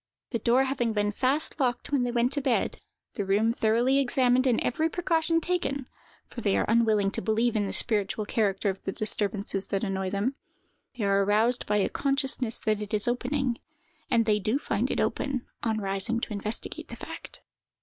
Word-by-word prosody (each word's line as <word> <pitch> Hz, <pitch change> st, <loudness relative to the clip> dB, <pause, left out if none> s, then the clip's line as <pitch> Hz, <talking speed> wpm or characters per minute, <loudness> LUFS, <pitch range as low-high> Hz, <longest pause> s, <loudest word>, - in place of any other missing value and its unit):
The 230 Hz, -, -1 dB
door 240 Hz, +4 st, +3 dB
having 245 Hz, -4 st, -1 dB
been 205 Hz, -1 st, +1 dB
fast 275 Hz, +8 st, -1 dB
locked 250 Hz, 0 st, -1 dB
when 280 Hz, -3 st, +2 dB
they 245 Hz, -, 0 dB
went 240 Hz, +1 st, +1 dB
to 285 Hz, -, -1 dB
bed, 260 Hz, -3 st, 0 dB, 0.3 s
the 205 Hz, -, -2 dB
room 205 Hz, +4 st, +2 dB
thoroughly 235 Hz, +4 st, +2 dB
examined, 255 Hz, -1 st, +3 dB
and 240 Hz, -3 st, +3 dB
every 315 Hz, +6 st, 0 dB
precaution 330 Hz, -1 st, +1 dB
taken—for 280 Hz, -8 st, -5 dB
they 200 Hz, -3 st, +2 dB
are -, -, +1 dB
unwilling 220 Hz, -3 st, +3 dB
to -, -, -1 dB
believe 225 Hz, +4 st, +1 dB
in 205 Hz, -2 st, +1 dB
the -, -, -3 dB
spiritual 210 Hz, -1 st, +1 dB
character 205 Hz, -2 st, +1 dB
of 190 Hz, -, -12 dB
the -, -, -2 dB
disturbances 205 Hz, -2 st, -1 dB
that 195 Hz, +1 st, -1 dB
annoy 190 Hz, -2 st, -1 dB
them—they 220 Hz, +2 st, -6 dB
are 200 Hz, 0 st, +3 dB
aroused 220 Hz, +5 st, +2 dB
by 210 Hz, -, +2 dB
a 200 Hz, -, +2 dB
consciousness 270 Hz, -4 st, -1 dB
that 215 Hz, -1 st, 0 dB
it 210 Hz, 0 st, -2 dB
is 210 Hz, -, 0 dB
opening, 250 Hz, 0 st, -1 dB, 0.5 s
and 230 Hz, -1 st, +3 dB
they 210 Hz, -1 st, +2 dB
do 215 Hz, +6 st, 0 dB
find -, -, -1 dB
it -, -, -1 dB
open, 265 Hz, -3 st, -1 dB, 0.2 s
on 220 Hz, -2 st, 0 dB
rising 195 Hz, +3 st, 0 dB
to 225 Hz, -, -4 dB
investigate 210 Hz, +2 st, -3 dB
the -, -, -8 dB
fact. -, -, -9 dB
230 Hz, 185 wpm, -27 LUFS, 205-255 Hz, 0.5 s, door